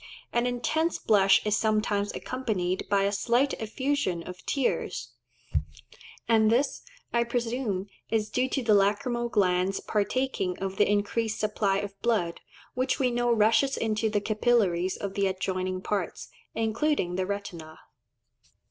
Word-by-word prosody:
An 240 +1 +2
intense 310 +7 0
blush 195 -2 +4
is 210 0 +2
sometimes 215 -2 +1
accompanied 200 -8 -2
by 200 -1 +3
a 200 - +1
slight 240 +7 +2
effusion 225 -6 -1
of 180 +1 -9
tears; 275 -4 -1 1.2
and 220 -2 +4
this, 255 +5 +1 0.3
I 235 0 +3
presume, 235 -4 -2 0.2
is 215 -2 0
due 255 +1 +1
to 265 0 -1
the 220 -2 +4
lacrymal 225 +4 +2
glands 185 -2 +2
partaking 210 -3 -1
of 195 0 -4
the - - +4
increased 210 +2 0
supply 210 -2 +1
of 200 -1 -5
blood, 205 -8 0 0.3
which 255 +1 0
we 255 -2 +1
know 240 0 +1
rushes 225 +4 +3
into 220 0 0
the 210 -1 0
capillaries 205 -5 +1
of 200 -1 -4
the 200 -1 +1
adjoining 185 0 -2
parts, 195 -3 -3 0.3
including 225 - 0
the 185 0 -1
retina. 170 -6 -6
215 Hz, 140 wpm, -28 LUFS, 195-240 Hz, 1.2 s, blush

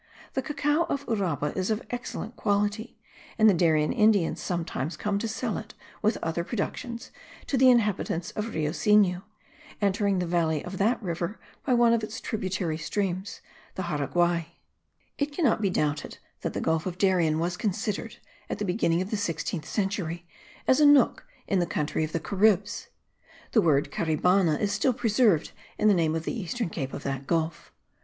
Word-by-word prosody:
The 265 - 0
cacao 295 +3 +1
of 280 -4 -3
Uraba 170 - -1
is 185 +1 -1
of 220 +1 -1
excellent 240 -1 -5
quality; 205 +3 -1 0.4
and 220 - +6
the 210 - +7
Darien 160 -3 +2
Indians 210 -6 +3
sometimes 165 -3 -3
come 205 -1 -1
to 230 - -2
sell 220 0 -2
it, 215 0 -11 0.3
with 215 - +2
other 165 +1 -1
productions, 235 +3 -4 0.3
to - - -1
the 260 0 +6
inhabitants 205 -7 +1
of 215 +2 -4
Rio 155 -1 0
Sinu, 195 -1 +3 0.6
entering 200 -1 +1
the 180 - 0
valley 165 -3 0
of 185 +1 -6
that 225 +5 +2
river 175 +3 -3 0.2
by 255 - +2
one 235 -1 +5
of 230 -1 +1
its 215 +1 -5
tributary 185 -6 -2
streams, 190 +2 -3 0.3
the 190 - -3
Jaraguai. 170 +2 0 0.7
It 290 0 0
cannot 280 -8 +2
be 200 - +2
doubted 150 -4 -1 0.2
that - - -3
the - - -3
Gulf 160 +2 0
of 180 -1 -4
Darien 180 -6 +3
was 170 +2 -1
considered, 210 +3 -3 0.3
at - - -2
the 210 - -2
beginning 180 -2 +1
of 190 - -9
the 215 - 0
sixteenth 170 -4 -3
century, 190 -5 -2 0.4
as 260 - +5
a 300 - +6
nook 285 -4 +4 0.2
in 195 - +1
the 175 - +1
country 150 +1 -1
of 155 - -3
the 165 - -1
Caribs. 200 +3 +1 0.6
The 220 - +4
word 145 -5 +2
Caribana 170 +1 +2
is 205 - 0
still 260 - +2
preserved 220 -7 +2 0.3
in 215 - +3
the 210 - +6
name 160 -3 +1
of 165 - -2
the - - -2
eastern 225 -2 -3
cape 135 -5 -4
of - - -6
that 135 0 -4
gulf. 165 -1 -1
190 Hz, 180 wpm, -27 LUFS, 165-220 Hz, 0.7 s, the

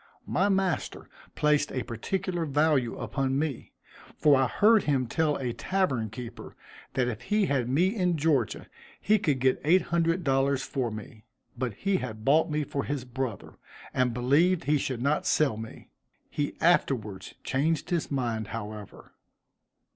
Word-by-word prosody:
My 195 +3 +1
master 190 -4 -1 0.3
placed 150 -1 +2
a 130 - -2
particular 170 - -3
value 145 -4 +1
upon 135 -1 -1
me, 145 -4 -3 0.5
for 150 -2 +5
I 130 -1 +3
heard 215 - +4
him 135 -4 +1
tell 150 +4 0
a 125 -3 -3
tavern 130 - -1
keeper 120 +2 -9 0.4
that 125 -2 +2
if 110 -3 -4
he 210 -1 +1
had 130 -7 0
me 180 - +2
in 180 -5 +1
Georgia 145 -7 0 0.3
he 215 +1 +3
could 150 -9 +1
get 130 +1 +2
eight 170 +5 +4
hundred 170 +1 +2
dollars 135 -1 +1
for 130 -4 -2
me, 110 +1 -9 0.3
but 120 -3 -3
he 195 - 0
had 110 -7 -6
bought 160 +4 +4
me 150 0 0
for 140 -1 -3
his 140 -3 -3
brother, 125 -4 -5 0.3
and 130 -1 +2
believed 145 +9 +2
he 145 +2 +2
should 125 -3 -3
not 145 +2 +1
sell 145 -7 +2
me; 110 +1 -10 0.4
he 145 -1 -2
afterwards 120 - +1
changed 150 +6 0
his 170 -3 0
mind, 120 -6 -2
however. 105 -2 -8
140 Hz, 155 wpm, -28 LUFS, 125-165 Hz, 0.5 s, for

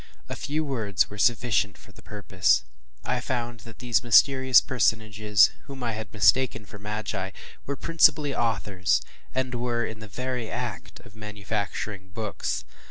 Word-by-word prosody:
A - - -5
few 155 +2 -2
words 105 - 0
were 105 - -8
sufficient 110 -4 +2
for 100 - -17
the - - -16
purpose. 95 - +1 0.4
I 125 - 0
found 120 -1 -3
that 115 0 -13
these 120 -3 +1
mysterious 130 +2 +6
personages, 110 -4 +3
whom 135 -2 -8
I 120 - -1
had 110 -1 -6
mistaken 110 +3 +3
for 105 - -12
magi, 105 -2 -4 0.4
were 140 - -2
principally 155 -2 +3
authors, 105 -6 0 0.3
and 130 -1 -1
were 120 -1 -1
in 110 -1 -7
the 110 - -9
very 125 +2 -4
act - - -5
of 100 - -17
manufacturing 105 -2 -5
books. 105 +1 -3
110 Hz, 150 wpm, -26 LUFS, 105-125 Hz, 0.4 s, mysterious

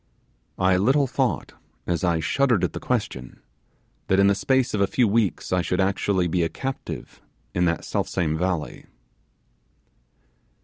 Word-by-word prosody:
I 95 0 +3
little 135 +9 +3
thought, 130 - -1 0.3
as 85 +1 -1
I 85 -2 +2
shuddered 125 - +2
at - - 0
the - - -4
question, 65 -1 -3 0.7
that 95 - +3
in 100 - +6
the 100 - +5
space 130 +4 +1
of 105 - 0
a 100 - +3
few 120 +3 +2
weeks 105 -3 0
I 90 - +3
should 90 +2 -1
actually 95 -1 +1
be 85 +1 0
a 80 - +1
captive 135 0 -6 0.3
in 90 0 +2
that 85 -1 -1
self - - -1
same 80 -3 -1
valley. 90 -2 -3
95 Hz, 160 wpm, -24 LUFS, 85-115 Hz, 0.7 s, in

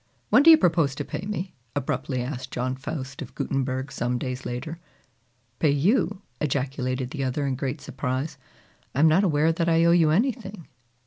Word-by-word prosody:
"When - - +7
do 320 - +7
you 320 - +10
propose 160 - +2
to - - -4
pay 195 - -5
me?" 190 -3 -4 0.2
abruptly 130 -2 -2
asked 130 0 -5
John 130 +1 -2
Faust 135 -1 -6
of - - -8
Gutenberg 135 0 -2
some 120 +1 -1
days 130 +1 -4
later. 155 +7 -5 0.8
"Pay 155 - +3
you!" 190 - +1 0.2
ejaculated 130 -2 -2
the 140 -3 -3
other 135 +2 -1
in 135 - 0
great 135 +2 -3
surprise, 135 +1 -3 0.6
"I - - 0
am 160 - +7
not 165 +6 +4
aware 155 -3 +3
that 165 +1 0
I 165 0 +4
owe 170 - +5
you 170 -3 +5
anything!" 205 - -1
145 Hz, 180 wpm, -25 LUFS, 130-170 Hz, 0.8 s, you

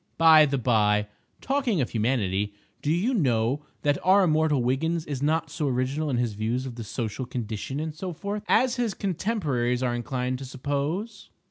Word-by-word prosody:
By 160 -2 +7
the 140 0 0
by, 105 -4 +2 0.4
talking 265 - 0
of 130 - -1
Humanity, 105 -4 0 0.3
do 145 - 0
you 195 +11 +1
know 130 - +1 0.2
that 145 -1 +2
our 190 +2 +5
immortal 155 -5 +2
Wiggins 160 +6 0
is 140 -3 -4
not 155 +1 0
so 150 -2 -2
original 135 +4 -1
in 130 - 0
his 120 -3 0
views 115 +5 -2
of 130 - -5
the 115 -1 -7
Social 110 +3 -4
Condition 120 +2 -4
and 155 0 -3
so 180 +4 -5
forth, 200 +5 -4
as 255 0 +3
his 235 -5 -1
contemporaries 150 - -1
are 125 -1 +1
inclined 125 +1 -2
to 135 - -6
suppose? 145 - -3
140 Hz, 175 wpm, -26 LUFS, 120-165 Hz, 0.4 s, By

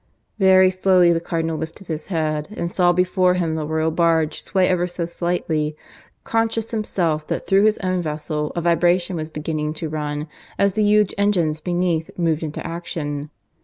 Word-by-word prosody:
Very 190 -1 +6
slowly 185 -2 +4
the 165 - 0
Cardinal 165 -1 -2
lifted 160 +5 -7
his 160 -2 -5
head, 155 -4 -1
and 170 - -2
saw 180 -1 +3
before 180 0 +2
him 170 -3 0
the 155 -1 -3
Royal 160 +1 0
barge 165 -2 +1
sway 185 -1 +1
ever 180 -1 +1
so 175 -1 -3
slightly, 165 -3 -2 0.5
conscious 225 0 -1
himself 170 -8 -1
that - - -3
through 195 +1 +4
his 215 0 +3
own 185 -1 0
vessel 150 -1 -3
a 170 - -1
vibration 175 +1 +2
was 155 -1 -4
beginning 155 0 -3
to 160 0 -4
run 150 0 -3 0.3
as 200 -1 +2
the 215 - 0
huge 210 -1 +3
engines 170 -7 +1
beneath 175 -2 0
moved 165 -3 +1
into 155 -2 -5
action. 150 -3 -4
170 Hz, 170 wpm, -21 LUFS, 155-185 Hz, 0.5 s, Very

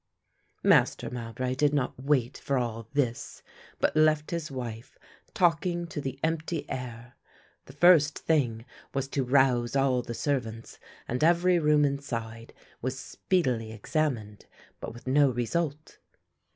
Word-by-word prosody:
Master - - +3
Mowbray 125 +1 -3
did 145 +2 +2
not 135 -4 0
wait 135 -3 +1
for 140 - -1
all 115 -2 -3
this, 130 -5 -2 0.4
but - - +1
left 155 -1 +3
his 170 -2 -3
wife 120 -4 -7 0.4
talking 175 0 +1
to 155 -3 -5
the 135 -1 -5
empty 165 +1 -2
air. 120 -2 -6 0.5
The 135 - -13
first 155 -1 +5
thing 120 -8 0 0.3
was 135 -1 -1
to 140 - -1
rouse 125 -2 +2
all 135 -2 +2
the 120 -1 -6
servants 115 -6 -3 0.3
and 125 +5 -2
every 175 +2 +4
room 150 -1 +4
inside 115 -5 -4 0.3
was 130 +2 -3
speedily 125 -9 -1
examined, 110 -3 -2 0.3
but - - -6
with 120 +1 -13
no 140 +2 +4
result. 145 +5 -3
135 Hz, 135 wpm, -28 LUFS, 120-150 Hz, 0.5 s, first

